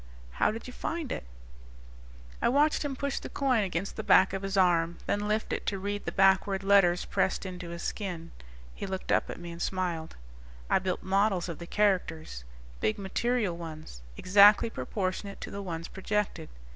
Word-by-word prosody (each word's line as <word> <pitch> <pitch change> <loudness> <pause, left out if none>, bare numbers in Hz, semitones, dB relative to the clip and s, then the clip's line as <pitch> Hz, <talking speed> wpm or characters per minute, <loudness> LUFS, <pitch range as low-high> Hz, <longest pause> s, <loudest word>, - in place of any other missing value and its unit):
"How - - +2
did 225 +2 -5
you 250 - -8
find 330 -1 -4
it?" - - -4 1.2
I - - +3
watched 295 +5 +3
him 285 -2 -3
push 280 0 -2
the - - -8
coin 255 -6 +1
against 190 0 -3
the - - -3
back 190 0 +5
of 195 - -2
his 195 0 -2
arm, 170 -2 +3
then 205 0 -1
lift 215 +1 -1
it - - -2
to 200 - 0
read 205 +1 -4
the - - -2
backward 195 0 +3
letters 195 -3 +4
pressed 190 0 0
into 180 -2 -6
his 170 0 -6
skin. 175 -5 -4 0.4
He - - -6
looked 190 -1 -4
up - - +2
at - - -6
me 175 0 -7
and 170 0 -8
smiled. 175 -4 -2 0.6
"I - - +5
built 185 -1 -3
models 190 -2 +1
of 170 - -6
the 170 - -8
characters. 175 - 0 0.3
Big 110 - 0
material 205 0 0
ones, 155 - -9 0.2
exactly 205 +4 +6
proportionate 200 -1 -3
to - - -6
the 200 - -5
ones 170 -3 -5
projected. 210 +1 -2
190 Hz, 185 wpm, -29 LUFS, 175-205 Hz, 1.2 s, exactly